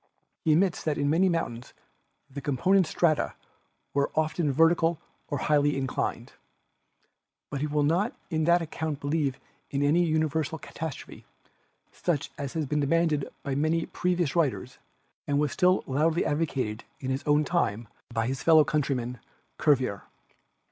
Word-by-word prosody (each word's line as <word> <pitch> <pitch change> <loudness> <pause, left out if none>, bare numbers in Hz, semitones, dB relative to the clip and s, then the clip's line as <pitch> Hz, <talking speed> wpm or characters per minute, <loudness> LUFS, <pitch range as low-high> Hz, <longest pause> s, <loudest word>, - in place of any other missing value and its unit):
He 160 - +3
admits 180 +2 +2
that 155 -2 0
in 145 0 +1
many 185 +4 +4
mountains 125 -9 -3 0.5
the 140 +1 -7
component 175 +7 +2
strata 155 -2 +1 0.6
are 140 0 +2
often 155 -1 +1
vertical 165 +2 +3 0.3
or 145 - -2
highly 145 +1 +2
inclined. 135 -1 -3 1.2
But 140 -2 -3
he 150 - 0
will 150 0 +1
not 180 - +1 0.2
on 160 -1 +1
that 170 +1 +4
account 155 -2 -4
believe 145 -2 -1 0.3
in 140 0 -1
any 160 +5 +4
universal 160 -1 0
catastrophe, 160 -1 -7 0.7
such 150 -5 -2
as 140 -2 -5
had 160 -3 -2
been 150 +2 0
demanded 150 -1 +1
by 140 - -2
many 155 +4 +1
previous 175 -4 -1
writers 135 -6 -1 0.5
and 145 - +1
was 150 -2 +1
still 185 +4 +3
loudly 155 +5 +1
advocated 135 -8 -1 0.2
in 130 -1 -3
his 135 +1 -1
own 150 +1 +4
time 120 - 0 0.2
by 115 -1 0
his 130 0 -3
fellow 160 +1 +6
country 145 -2 0
man, 125 0 -4 0.4
Cuvier. 130 -9 +1
150 Hz, 150 wpm, -27 LUFS, 140-165 Hz, 1.2 s, fellow